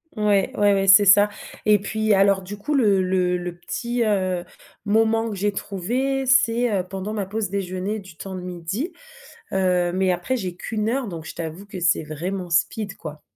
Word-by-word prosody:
Ouais, 205 Hz, -2 st, +2 dB
ouais, 205 Hz, -1 st, +4 dB
ouais, 195 Hz, 0 st, 0 dB
c'est 200 Hz, +2 st, +8 dB
ça. 205 Hz, +1 st, +7 dB, 0.4 s
Et 210 Hz, -1 st, +5 dB
puis, 215 Hz, +1 st, 0 dB
alors 195 Hz, -1 st, +3 dB
du 200 Hz, +3 st, -7 dB
coup, 295 Hz, +8 st, -2 dB
le 205 Hz, -7 st, +3 dB
le 185 Hz, -1 st, +1 dB
le 175 Hz, -1 st, -5 dB
petit, 235 Hz, +6 st, -2 dB
heu, 185 Hz, -4 st, 0 dB, 0.4 s
moment 225 Hz, +2 st, +2 dB
que -, -, -4 dB
j'ai 205 Hz, +2 st, 0 dB
trouvé, 250 Hz, +9 st, -2 dB
c'est, 240 Hz, -2 st, +3 dB
heu, 190 Hz, -3 st, 0 dB
pendant 195 Hz, +2 st, -5 dB
ma 205 Hz, -3 st, -2 dB
pause 205 Hz, 0 st, -3 dB
déjeuner, 195 Hz, +2 st, -3 dB
du 190 Hz, -5 st, -13 dB
temps 190 Hz, +1 st, -7 dB
de 180 Hz, -, -6 dB
midi. 180 Hz, -, -4 dB, 0.6 s
Heu, 180 Hz, -2 st, +2 dB
mais 185 Hz, 0 st, +1 dB
après, 180 Hz, +9 st, -1 dB
j'ai 185 Hz, -6 st, -4 dB
qu'1 220 Hz, +6 st, -2 dB
donc, 165 Hz, -3 st, -7 dB
je -, -, -8 dB
t'avoue 165 Hz, +3 st, -6 dB
que 195 Hz, -3 st, -8 dB
c'est 175 Hz, -2 st, +2 dB
vraiment 175 Hz, +4 st, -5 dB
speed, 195 Hz, +4 st, 0 dB
quoi. 150 Hz, -2 st, -9 dB
195 Hz, 190 wpm, -23 LUFS, 180-215 Hz, 0.6 s, c'est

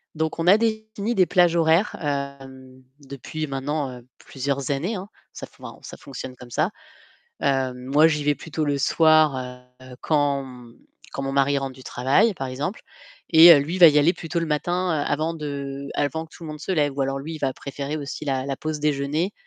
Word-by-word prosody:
Donc 160 Hz, +1 st, -2 dB
on 165 Hz, -, -1 dB
a 200 Hz, +3 st, +7 dB
défini 220 Hz, 0 st, -2 dB
des 185 Hz, -3 st, +4 dB
plages 175 Hz, -2 st, +3 dB
horaires, 165 Hz, +4 st, +2 dB
hem, 135 Hz, -2 st, -5 dB, 0.2 s
depuis 140 Hz, +3 st, -6 dB
maintenant, 140 Hz, 0 st, -3 dB
heu, 120 Hz, -, -21 dB
plusieurs 140 Hz, 0 st, -3 dB
années, 175 Hz, +11 st, -2 dB
hein. 195 Hz, +2 st, -7 dB, 0.2 s
Ça -, -, -7 dB
f -, -, -24 dB
enfin, -, -, -10 dB
ça -, -, -9 dB
fonctionne 130 Hz, -1 st, -8 dB
comme 125 Hz, -1 st, -13 dB
ça. 165 Hz, -, 0 dB, 0.7 s
Heu, 135 Hz, -2 st, +1 dB
moi 140 Hz, +5 st, +3 dB
j'y 150 Hz, -2 st, -1 dB
vais 145 Hz, 0 st, +2 dB
plutôt 160 Hz, -1 st, -4 dB
le 145 Hz, -1 st, 0 dB
soir, 155 Hz, 0 st, +4 dB, 0.5 s
heu, 130 Hz, -1 st, -12 dB
quand, 145 Hz, -3 st, +1 dB
mmh, 125 Hz, -2 st, -13 dB, 0.3 s
quand 140 Hz, -, -5 dB
mon 135 Hz, 0 st, -3 dB
mari 140 Hz, +1 st, +2 dB
rentre 135 Hz, -1 st, -4 dB
du 130 Hz, -, -14 dB
travail, 140 Hz, -, +2 dB
par 135 Hz, -6 st, -5 dB
exemple, 145 Hz, -, -4 dB, 0.5 s
et 160 Hz, -2 st, +9 dB
lui 160 Hz, +6 st, -3 dB
il -, -, -4 dB
va 170 Hz, -, +11 dB
y 150 Hz, 0 st, +3 dB
aller 165 Hz, +5 st, +4 dB
plutôt 170 Hz, +1 st, -4 dB
le 165 Hz, -, -2 dB
matin 175 Hz, +4 st, -1 dB, 0.2 s
avant 155 Hz, +3 st, -1 dB
de 140 Hz, -2 st, -6 dB
avant 160 Hz, +3 st, -1 dB
que 160 Hz, -, -22 dB
tout 170 Hz, -, -12 dB
le -, -, -7 dB
monde 150 Hz, 0 st, -8 dB
se 190 Hz, -, -3 dB
lève 145 Hz, -5 st, +1 dB
ou -, -, +1 dB
alors, 135 Hz, 0 st, -1 dB
lui, 160 Hz, +4 st, -6 dB
il -, -, -9 dB
va 135 Hz, -2 st, 0 dB
préférer 140 Hz, +2 st, -5 dB
aussi 145 Hz, +1 st, -6 dB
la 135 Hz, -1 st, -1 dB
la 135 Hz, -1 st, -3 dB
pause 155 Hz, -1 st, -4 dB
déjeuner, 150 Hz, +5 st, -1 dB
145 Hz, 210 wpm, -23 LUFS, 135-165 Hz, 0.7 s, va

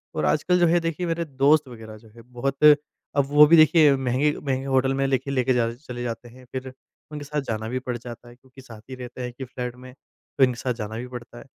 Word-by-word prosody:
और -, -, -1 dB
आजकल 180 Hz, 0 st, +2 dB
जो 175 Hz, -, +4 dB
है 175 Hz, +1 st, +3 dB
देखिए 165 Hz, +1 st, -3 dB
मेरे 170 Hz, 0 st, -2 dB
दोस्त 145 Hz, +1 st, +2 dB
वग़ैरह 110 Hz, -3 st, -11 dB
जो 110 Hz, 0 st, -19 dB
है 115 Hz, -, -13 dB
बहुत 125 Hz, +4 st, -4 dB, 0.5 s
अब 140 Hz, -, +3 dB
वो 150 Hz, +1 st, +7 dB
भी 165 Hz, +2 st, +6 dB
देखिए 155 Hz, -2 st, +6 dB
महँगे-महँगे 135 Hz, +1 st, -1 dB
होटल 130 Hz, 0 st, +1 dB
में 135 Hz, -, +1 dB
लेके 135 Hz, +1 st, -1 dB
लेके 130 Hz, -1 st, +1 dB, 0.2 s
चले 125 Hz, -3 st, -8 dB
जाते 120 Hz, 0 st, -6 dB
हैं 125 Hz, +1 st, -16 dB
फिर 130 Hz, 0 st, -6 dB, 0.4 s
उनके 150 Hz, -1 st, -7 dB
साथ 150 Hz, +1 st, -2 dB
जाना 110 Hz, 0 st, -3 dB
भी 130 Hz, +2 st, -2 dB
पड़ 125 Hz, -1 st, -5 dB
जाता 120 Hz, 0 st, -11 dB
है 120 Hz, -, -15 dB
क्योंकि 130 Hz, +1 st, -18 dB
साथ 115 Hz, -5 st, -13 dB
ही 130 Hz, -, -6 dB
रहते 125 Hz, 0 st, -9 dB
हैं 125 Hz, -, -3 dB
एक 120 Hz, -, -15 dB
ही 130 Hz, -, -4 dB
फ्लैट 125 Hz, -1 st, -6 dB
में, 125 Hz, 0 st, -13 dB, 0.4 s
तो 135 Hz, -, +5 dB
इनके 125 Hz, -2 st, +2 dB
साथ 125 Hz, -2 st, -2 dB
जाना 110 Hz, -1 st, -6 dB
भी 125 Hz, +2 st, -6 dB
पड़ता 120 Hz, -1 st, -10 dB
है। 120 Hz, -, -13 dB
130 Hz, 245 wpm, -24 LUFS, 120-145 Hz, 0.5 s, वो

